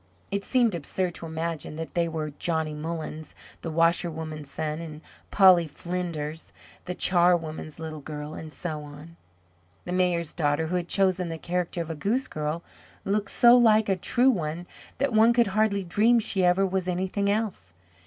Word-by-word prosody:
It 200 0 -1
seemed 240 -1 +2
absurd 175 +2 -2
to 165 - -8
imagine 160 -1 -4
that 165 +1 -6
they 170 -1 +1
were 155 -2 -4
Johnny 160 -2 -1
Mullens, 160 0 -6 0.3
the 165 - -4
washerwoman's 160 -2 0
son, 155 +2 -3
and 155 -2 -8 0.3
Polly 185 -4 +6
Flinders, 160 -1 -5 0.3
the 180 - -4
charwoman's 170 -4 +1
little 160 -2 -6
girl, 150 +1 -7
and 155 -1 -8
so 155 -1 -4
on. 150 +3 -12 0.7
The 175 - -5
Mayor's 180 -3 +1
daughter, 150 -1 0
who 170 +3 -2
had 175 -1 -1
chosen 185 -2 +2
the 165 - -4
character 175 +1 -2
of 165 - -7
a - - -4
goose 225 - 0
girl, 155 +2 -3 0.4
looked 205 0 0
so 240 0 +6
like 220 -3 +5
a 195 - +3
true 245 +8 +3
one 170 -4 -3 0.3
that 275 -1 0
one 225 +2 +5
could 235 0 +4
hardly 210 -2 +2
dream 215 +7 +3
she 200 -4 +1
ever 180 +2 +4
was 190 -1 -2
anything 190 +3 -1
else. 200 - -2
170 Hz, 170 wpm, -26 LUFS, 155-195 Hz, 0.7 s, Polly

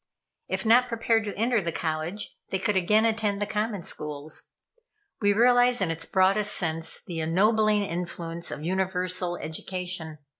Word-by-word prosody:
If - - -2
not 245 +3 +5
prepared 230 -1 +1
to 205 - -4
enter 230 0 +2
the 170 -2 -2
college, 160 +6 -3
they 190 - 0
could 195 +2 0
again 210 +4 +3
attend 215 -3 +1
the 205 - 0
common 210 -2 -2
schools. 150 0 -6 0.7
We 205 -1 +4
realize 245 +3 +4
in 185 -4 0
its 165 0 -5
broadest 195 +2 +3
sense 160 -2 -3
the 170 -2 -5
ennobling 210 +6 +3
influence 170 -2 -4
of 150 - -6
universal 180 -1 -1
education. 165 0 -4
190 Hz, 150 wpm, -27 LUFS, 170-215 Hz, 0.7 s, not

